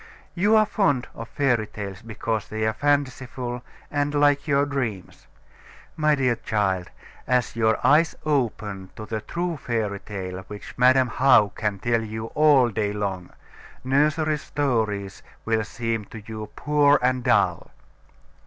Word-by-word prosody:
You 205 +5 +3
are 215 0 +5
fond 145 - +1
of 115 0 -8
fairy 120 -6 +1
tales, 100 -3 -7
because 110 -1 -3
they 110 0 -2
are 110 - +1
fanciful, 130 -3 -1 0.3
and 145 0 -1
like 145 +1 +3
your 140 -1 +3
dreams. 125 - -4 0.7
My 150 -1 +3
dear 125 -4 +1
child, 95 -6 -1 0.4
as 125 -2 +1
your 110 -1 +2
eyes 155 +3 +4
open 110 -9 -1
to 110 - -7
the 110 0 -4
true 170 +5 -3
fairy 110 -6 -2
tale 95 -3 -6
which 105 0 -9
Madam 130 +1 +4
How 120 -4 +4
can 105 0 -3
tell 115 +3 0
you 110 +1 -6
all 145 -5 +5
day 105 -2 -1
long, 95 -4 -3 0.5
nursery 150 +3 +2
stories 110 -10 -2 0.2
will 110 -1 +1
seem 115 -1 -3
to 110 +1 -11
you 110 -1 -7
poor 145 -1 +3
and 125 0 +1
dull. - - +2
120 Hz, 145 wpm, -24 LUFS, 105-145 Hz, 0.7 s, are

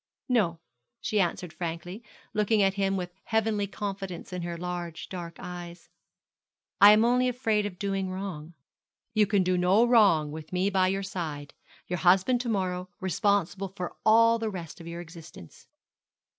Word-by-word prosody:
no,' 200 -10 +1 0.4
she 210 - -1
answered, 175 -1 -2
frankly, 175 +5 -5 0.3
looking 210 0 +2
at 195 -1 +3
him 195 -1 0
with 180 -1 -5
heavenly 220 -2 0
confidence 195 -3 -6
in 180 - -3
her 170 0 -4
large 175 -1 -5
dark 170 -3 -7
eyes; 175 -1 -9 0.9
'I 205 +1 +10
am 215 +2 +4
only 250 +1 +3
afraid 220 -4 0
of 180 -3 -9
doing 195 -1 -2
wrong.' 180 -4 -6 0.6
'You 215 -2 +3
can 200 -2 +2
do 180 0 +1
no 190 +6 +4
wrong 200 -11 +4
with 155 0 -9
me 185 +2 +1
by 190 -1 +3
your 195 +1 -1
side, 155 -7 -5 0.3
your 180 0 -3
husband 190 +8 +4
to 245 - -4
morrow, 185 -3 -2
responsible 195 0 0
for 180 -1 -4
all 230 +1 +5
the 225 -1 -2
rest 170 -4 -8
of 165 - -10
your 170 +1 -6
existence.' 165 - -13
190 Hz, 160 wpm, -28 LUFS, 175-210 Hz, 0.9 s, I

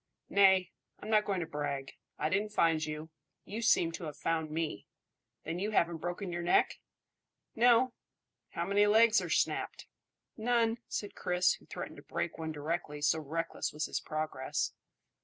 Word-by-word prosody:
"Nay! 190 -2 +5 0.3
I'm 215 - -6
not 210 -1 +4
going 195 -3 -1
to - - -2
brag. 145 -3 -3 0.3
I - - 0
didn't 205 +3 0
find 165 -5 +3
you; 155 +1 -5 0.3
you 220 +3 -5
seem 175 -7 +4
to 165 - -6
have 150 -2 -6
found 160 -1 -1
me. 155 -8 -3 0.6
Then 170 - -3
you 205 +3 -1
haven't 170 -6 +1
broken 175 +2 -4
your 175 - -2
neck?" 175 - +3 0.8
"No." 240 +1 +5 0.6
"How 170 - -3
many 205 +2 +3
legs 225 +2 +6
are - - -5
snapped?" - - 0 0.5
"None," 230 0 +2
said 205 - -4
Chris, 180 +1 +2
who - - -13
threatened - - -6
to - - -10
break 170 - -4
one 160 0 -3
directly, 150 0 -3
so 160 +2 +3
reckless 160 +3 -3
was 150 +1 -2
his - - -2
progress. 155 -4 -2
175 Hz, 165 wpm, -32 LUFS, 155-205 Hz, 0.8 s, legs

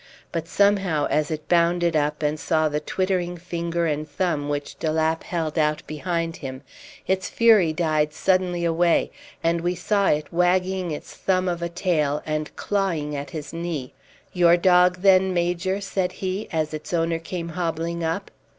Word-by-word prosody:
But 165 -1 -3
somehow, 195 -6 +2
as 150 -1 +1
it 155 -1 -5
bounded 170 -1 +2
up 150 0 0
and 150 +1 0
saw 155 -1 +1
the 150 0 -1
twittering 180 +2 -1
finger 170 0 -2
and 155 -1 -2
thumb 145 -2 -1
which 145 0 -4
de 160 - 0
Lapp 160 +1 +1
held 165 -4 -2
out 150 0 +1
behind 165 +2 -3
him, 130 -4 -7 0.4
its 190 0 0
fury 220 -8 +5
died 155 -2 +1
suddenly 180 0 +1
away, 170 0 +2 0.3
and 165 0 +1
we 175 +1 0
saw 200 +3 +1
it 150 +2 0
wagging 180 +1 +1
its 150 - -6
thumb 185 -1 0
of 175 -1 -2
a 170 - -2
tail 155 -5 0
and 155 0 -3
clawing 170 -8 -1
at 140 0 -5
his 155 -2 -7
knee. 165 -6 -4 0.4
"Your 175 -1 +5
dog 180 0 +4
then, 190 -1 +5
Major?" 175 +2 0
said 190 -2 -2
he, 190 +2 -3
as 155 -1 -1
its 155 +3 -4
owner 165 0 0
came 170 0 -5
hobbling 170 0 -2
up. 165 +5 -2
170 Hz, 170 wpm, -24 LUFS, 155-180 Hz, 0.4 s, fury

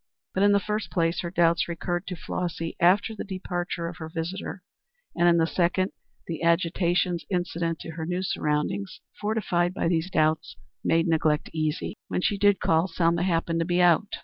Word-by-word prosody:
But 190 - 0
in 205 0 +6
the 200 - +5
first 210 +1 -3
place, 165 -2 0
her 175 - -3
doubts 170 -1 +2
recurred 175 +2 -3
to 180 - -4
Flossy 165 -1 -4
after 190 +6 +4
the - - -5
departure 175 -3 -3
of 170 - -7
her 160 -1 -7
visitor, 175 +3 -5 0.5
and 175 0 +3
in 170 - +4
the 165 - +4
second, 180 +3 +1 0.3
the 165 -2 -5
agitations 170 +1 +1
incident 170 -2 -1
to 165 - -7
her 160 0 -5
new 180 +1 -1
surroundings, 150 +3 -1 0.2
fortified 185 -5 0
by - - 0
these 165 +1 0
doubts, 155 -3 +1 0.3
made 165 +1 +2
neglect 155 -2 +1
easy. 155 -1 -2
When - - -1
she 200 +2 0
did 205 0 +4
call, 165 +2 +2
Selma 170 -1 +1
happened 165 -2 0
to 165 - +1
be 175 +1 +1
out. 175 +3 +4
175 Hz, 180 wpm, -26 LUFS, 165-185 Hz, 0.5 s, in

